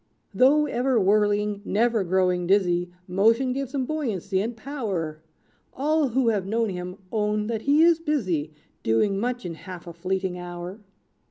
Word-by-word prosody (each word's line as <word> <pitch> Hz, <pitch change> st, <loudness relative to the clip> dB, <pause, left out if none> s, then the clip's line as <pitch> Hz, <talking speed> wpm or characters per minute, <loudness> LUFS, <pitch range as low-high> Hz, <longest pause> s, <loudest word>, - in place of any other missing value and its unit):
"Though 275 Hz, +8 st, +5 dB
ever 255 Hz, -3 st, +1 dB
whirling, 205 Hz, 0 st, +2 dB
never 225 Hz, +1 st, +1 dB
growing 180 Hz, -1 st, +1 dB
dizzy; 180 Hz, -2 st, +2 dB, 0.2 s
Motion 225 Hz, +8 st, +3 dB
gives 275 Hz, +1 st, -4 dB
him 265 Hz, -2 st, 0 dB
buoyancy 210 Hz, -, -1 dB
and 230 Hz, +3 st, -4 dB
power. 200 Hz, -, -4 dB, 0.5 s
All 300 Hz, +2 st, +2 dB
who 250 Hz, -1 st, +2 dB
have 200 Hz, -4 st, -1 dB
known 225 Hz, +1 st, 0 dB
him 180 Hz, 0 st, -5 dB
own 210 Hz, -1 st, 0 dB
that 220 Hz, 0 st, -2 dB
he 290 Hz, +5 st, +4 dB
is 335 Hz, -1 st, +5 dB
busy, 185 Hz, -, -1 dB, 0.3 s
Doing 195 Hz, -, +1 dB
much 245 Hz, 0 st, -2 dB
in 175 Hz, -, -4 dB
half 175 Hz, +1 st, -10 dB
a 170 Hz, -, -8 dB
fleeting 185 Hz, +1 st, -2 dB
hour. 175 Hz, +3 st, -7 dB
210 Hz, 155 wpm, -25 LUFS, 180-250 Hz, 0.5 s, Though